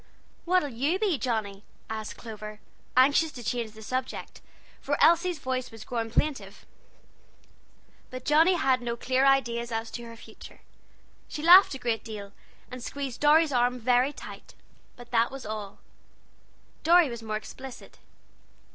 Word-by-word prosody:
"What'll 355 -4 +2
you 275 +9 0
be, 385 -8 0
Johnnie?" 210 -5 -3 0.2
asked 220 -1 -6
Clover, 215 -2 -9 0.4
anxious 285 +5 +4
to 245 - -9
change 230 -1 -3
the 220 0 -12
subject, 255 +3 -5 0.4
for - - -1
Elsie's 340 +1 +4
voice 255 -2 -3
was 225 -1 -11
growing 230 -2 -3
plaintive. 275 +5 -2 1.4
But 255 0 -8
Johnnie 320 +5 +5
had 265 -6 +2
no 235 -1 -3
clear 260 +3 +2
ideas 235 -3 +1
as 225 0 -3
to 240 - -6
her 230 0 -10
future. 230 - -14 0.7
She 305 -2 -6
laughed 355 -2 +8
a - - -5
great 235 -4 -2
deal, 205 -3 -8 0.4
and 250 -1 -7
squeezed 275 -3 -5
Dorry's 305 +1 +5
arm 245 0 +2
very 250 +3 +2
tight, - - -11 0.4
but 245 -1 -14
that 230 -1 +3
was 270 -1 -9
all. 210 -2 -6 1.0
Dorry 340 +1 +5
was 235 -3 -6
more 215 -1 -3
explicit. 260 +3 -11
250 Hz, 145 wpm, -27 LUFS, 225-285 Hz, 1.4 s, laughed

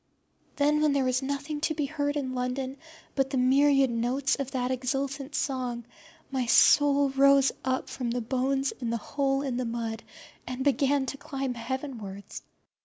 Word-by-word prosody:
Then 300 +1 +2
when 300 -2 +3
there 280 -1 +2
was 255 0 +1
nothing 285 +2 -3
to 315 0 0
be 295 -1 0
heard 290 0 -2
in 260 -3 -3
London 255 +2 -3 0.4
but 270 -1 0
the 270 - -2
myriad 270 +1 +4
notes 245 +4 0
of 275 -2 -4
that 255 -1 -2
exultant 270 +2 -2
song, 250 -4 -2 0.5
my 260 -3 -1
soul 285 +3 +5
rose 275 0 +5
up 260 0 -1
from 245 -3 -4
the 245 +1 -1
bones 265 +3 0
in 240 -3 -3
the 235 - 0
hole 275 +3 -1
in 260 -3 -2
the 255 - -1
mud 230 -1 -3 0.5
and 255 +1 -3
began 280 0 +2
to 275 - -5
climb 270 -2 -4
heavenwards. 235 -5 -6
270 Hz, 170 wpm, -28 LUFS, 250-280 Hz, 0.5 s, soul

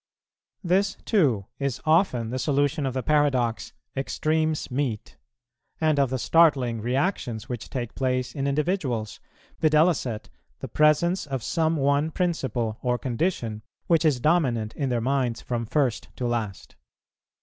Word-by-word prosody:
This, 195 +2 +2
too, 135 - +2
is 140 -3 -2
often 155 - +2
the 130 - -2
solution 145 +1 +1
of 130 - -4
the 130 - -1
paradox 130 -8 +1 0.2
"Extremes 155 +2 -1
meet," 125 -5 -2 0.6
and 155 -2 +2
of 135 -2 +3
the 130 - -1
startling 130 -5 +3
reactions 125 - -1
which 120 -4 -6
take 120 -3 -4
place 130 -1 -1
in 140 -1 -2
individuals; 140 - -1 0.4
viz., 155 - +3 0.3
the 105 - -8
presence 155 +3 +3
of 135 -4 -3
some 160 +6 +1
one 140 +2 +2
principle 130 - -2
or 125 -1 +1
condition, 120 - -2 0.2
which 165 -2 +3
is 150 -6 +3
dominant 120 -8 +1
in 140 -3 -1
their 120 -2 0
minds 130 -2 0
from 120 -2 -3
first 130 -3 0
to 125 - -3
last. 115 -5 -3
135 Hz, 140 wpm, -25 LUFS, 120-155 Hz, 0.6 s, of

